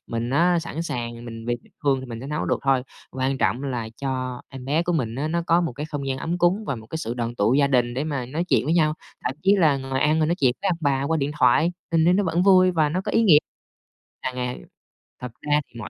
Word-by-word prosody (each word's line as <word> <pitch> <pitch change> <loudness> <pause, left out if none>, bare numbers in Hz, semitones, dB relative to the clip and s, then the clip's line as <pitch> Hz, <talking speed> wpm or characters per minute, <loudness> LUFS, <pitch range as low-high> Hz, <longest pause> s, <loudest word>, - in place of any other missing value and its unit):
Mình 115 +1 -3
á 170 +5 +3
sẵn 165 0 -4
sàng, 120 -6 -5
mình 115 -1 -8
vì 120 0 0
tình - - -24
thương 135 -2 +2
mình 115 -1 -6
sẽ 130 - -7
nấu 150 +1 -2
được - - 0
thôi, 135 -2 +2 0.3
quan 130 +1 -1
trọng 120 +7 +1
là 125 -5 -3
cho 130 -2 -3
em 130 -1 -9
bé 150 +5 +1
của 175 0 -1
mình 120 -8 -1
á, 140 +5 -2
nó 170 +1 0
có 170 +1 +4
một 165 -6 -2
cái 145 +5 -5
không 145 -3 -5
gian 130 0 -2
ấm 170 +2 -2
cúng 180 +5 +2
và 135 - -1
một 110 -1 -11
cái 160 - -5
sự 115 -6 -4
đoàn 120 -1 -3
tụ 110 +2 +2
gia 140 0 +4
đình 120 -3 +1
để 135 +4 -1
mà 140 -5 -3
nói 155 +7 -2
chuyện - - +3
với 160 - +1
nhau. 155 -3 +3 0.3
Thậm 130 - -1
chí 200 +2 +4
là 155 -6 +4
ngồi 135 0 -3
ăn 155 +2 +3
rồi 155 - +2
nói 170 - +1
chuyện 130 -3 +3
với 200 - +1
ông 170 -2 0
bà 140 -3 +1
qua 160 +3 0
điện 145 -1 -1
thoại 155 +8 +4 0.2
mình 160 -1 +4
thấy 175 +1 +5
nó 205 - +2
vẫn 170 0 +1
vui 185 -1 +6
và 160 -4 +2
nó 175 +5 -1
có - - -4
ý 225 - +4
nghĩa. 175 -9 +7 0.8
À, 130 - -3
ng 125 - -4 0.6
thật 125 -2 -5
ra 150 0 +2
thì 120 - -12
mỗi 110 - -7
140 Hz, 280 wpm, -24 LUFS, 125-165 Hz, 0.8 s, nghĩa